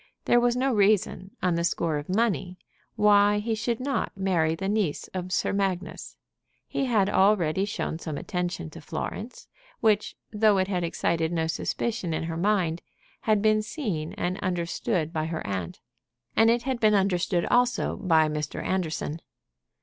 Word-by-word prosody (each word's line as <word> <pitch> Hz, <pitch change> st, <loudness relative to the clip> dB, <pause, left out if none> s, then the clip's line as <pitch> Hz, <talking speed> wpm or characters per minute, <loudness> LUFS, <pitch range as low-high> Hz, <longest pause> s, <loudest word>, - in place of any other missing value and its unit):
There 240 Hz, -, +5 dB
was 240 Hz, 0 st, +2 dB
no 260 Hz, +1 st, +1 dB
reason, 200 Hz, -2 st, +1 dB
on 180 Hz, -1 st, +3 dB
the 170 Hz, 0 st, 0 dB
score 165 Hz, -2 st, 0 dB
of 145 Hz, -, -10 dB
money, 195 Hz, -3 st, 0 dB, 0.4 s
why 205 Hz, 0 st, +5 dB
he 220 Hz, +2 st, -1 dB
should 225 Hz, +1 st, -1 dB
not 270 Hz, -2 st, -1 dB
marry 170 Hz, -5 st, +1 dB
the 190 Hz, +3 st, -4 dB
niece 200 Hz, -7 st, -1 dB
of 185 Hz, -1 st, -5 dB
Sir -, -, 0 dB
Magnus. 190 Hz, -2 st, -3 dB, 0.5 s
He 275 Hz, -, -1 dB
had 215 Hz, -6 st, +2 dB
already 190 Hz, -3 st, +3 dB
shown 185 Hz, -5 st, -3 dB
some 155 Hz, -3 st, -5 dB
attention 175 Hz, -2 st, -3 dB
to 165 Hz, -, -10 dB
Florence, 215 Hz, -, -6 dB, 0.3 s
which, 210 Hz, -1 st, +2 dB, 0.2 s
though 210 Hz, -1 st, +4 dB
it 185 Hz, 0 st, +1 dB
had 180 Hz, -3 st, -1 dB
excited 165 Hz, -1 st, 0 dB
no 165 Hz, -2 st, 0 dB
suspicion 175 Hz, +2 st, -2 dB
in -, -, -2 dB
her 165 Hz, 0 st, -3 dB
mind, 175 Hz, -2 st, +1 dB, 0.5 s
had 215 Hz, -1 st, +3 dB
been 215 Hz, 0 st, +4 dB
seen 205 Hz, -, -4 dB
and 180 Hz, +2 st, -2 dB
understood 170 Hz, -2 st, -1 dB
by 155 Hz, -1 st, -1 dB
her 165 Hz, -1 st, -4 dB
aunt; 95 Hz, -4 st, -4 dB, 0.6 s
and 225 Hz, 0 st, +5 dB
it 235 Hz, 0 st, +2 dB
had 260 Hz, -2 st, -2 dB
been 215 Hz, -2 st, +4 dB
understood 180 Hz, -2 st, +1 dB
also 245 Hz, 0 st, +2 dB
by 160 Hz, -5 st, +3 dB
Mr. 150 Hz, -1 st, -3 dB
Anderson. 165 Hz, -3 st, -2 dB
190 Hz, 165 wpm, -26 LUFS, 165-215 Hz, 0.6 s, There